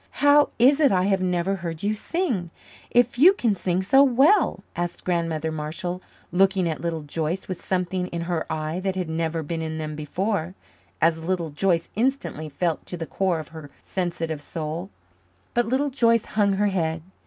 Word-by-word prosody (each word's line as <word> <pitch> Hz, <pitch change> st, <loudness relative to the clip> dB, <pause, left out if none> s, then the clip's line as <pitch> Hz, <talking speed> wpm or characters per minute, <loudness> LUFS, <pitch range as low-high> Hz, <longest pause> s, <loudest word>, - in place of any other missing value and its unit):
"How 290 Hz, 0 st, +6 dB
is 270 Hz, +5 st, +5 dB
it 290 Hz, -3 st, +5 dB
I 185 Hz, -1 st, +3 dB
have 195 Hz, -1 st, +1 dB
never 180 Hz, +1 st, 0 dB
heard 170 Hz, -2 st, -6 dB
you 210 Hz, +1 st, +1 dB
sing, 225 Hz, -, -2 dB, 0.4 s
if 245 Hz, 0 st, +2 dB
you 355 Hz, +7 st, +8 dB
can 235 Hz, -, +1 dB
sing 185 Hz, -1 st, -1 dB
so 270 Hz, +8 st, +5 dB
well?" 280 Hz, -, +4 dB
asked 175 Hz, 0 st, -3 dB
Grandmother 165 Hz, -3 st, -1 dB
Marshall, 160 Hz, +4 st, -4 dB, 0.3 s
looking 190 Hz, 0 st, +3 dB
at 160 Hz, -2 st, -3 dB
Little 165 Hz, -2 st, -2 dB
Joyce 160 Hz, +5 st, -3 dB
with 185 Hz, -2 st, -6 dB
something 180 Hz, 0 st, -1 dB
in 170 Hz, -2 st, -4 dB
her 170 Hz, -1 st, -2 dB
eyes 155 Hz, +3 st, -2 dB
that 190 Hz, 0 st, -1 dB
had 185 Hz, -3 st, -2 dB
never 165 Hz, 0 st, -1 dB
been 165 Hz, +2 st, -3 dB
in 160 Hz, 0 st, -4 dB
them 155 Hz, -1 st, -4 dB
before 180 Hz, +4 st, -2 dB, 0.5 s
as 165 Hz, 0 st, +2 dB
Little 170 Hz, -2 st, -1 dB
Joyce 170 Hz, +2 st, +1 dB
instantly 230 Hz, -, -1 dB
felt 160 Hz, +2 st, -1 dB
to 175 Hz, -, -5 dB
the 165 Hz, -, -4 dB
core 185 Hz, 0 st, 0 dB
of 155 Hz, -2 st, -7 dB
her 160 Hz, -3 st, -10 dB
sensitive 165 Hz, -4 st, -3 dB
soul. 160 Hz, +4 st, -5 dB, 0.6 s
But 240 Hz, -1 st, +1 dB
Little 270 Hz, +4 st, +1 dB
Joyce 230 Hz, -4 st, +3 dB
hung 205 Hz, -2 st, +1 dB
her 205 Hz, +1 st, +2 dB
head. 165 Hz, -4 st, -1 dB
180 Hz, 180 wpm, -24 LUFS, 160-205 Hz, 0.6 s, you